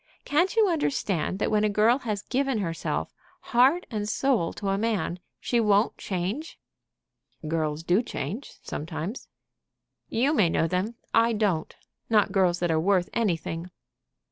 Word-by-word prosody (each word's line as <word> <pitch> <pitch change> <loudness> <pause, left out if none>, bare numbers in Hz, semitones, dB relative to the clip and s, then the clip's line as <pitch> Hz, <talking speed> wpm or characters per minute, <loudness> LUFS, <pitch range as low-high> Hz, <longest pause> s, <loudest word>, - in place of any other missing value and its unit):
Can't 345 +8 +2
you 440 -2 +5
understand 270 - 0
that - - -1
when 210 0 +3
a 215 - +3
girl 220 +5 +3
has 210 -5 -3
given 270 0 0
herself, 165 -5 -2 0.4
heart 270 +9 +5
and 210 -2 -2
soul, 240 -9 +1
to 200 - -3
a 195 - +1
man, 205 -6 -1 0.2
she 240 - 0
won't 210 0 +3
change?" 200 - -3 0.9
"Girls 155 -1 -1
do 180 +6 +3
change 225 - -5
sometimes." 165 - -5 0.8
"You 265 +6 +2
may 205 - +4
know 165 - +1
them; 190 +7 -1 0.2
I 230 +1 +4
don't, 200 -7 0 0.3
not 210 -3 +3
girls 185 -3 +3
that 175 -1 +1
are 160 - +2
worth 185 +1 +2
anything." 170 -5 -1
210 Hz, 145 wpm, -26 LUFS, 175-235 Hz, 0.9 s, you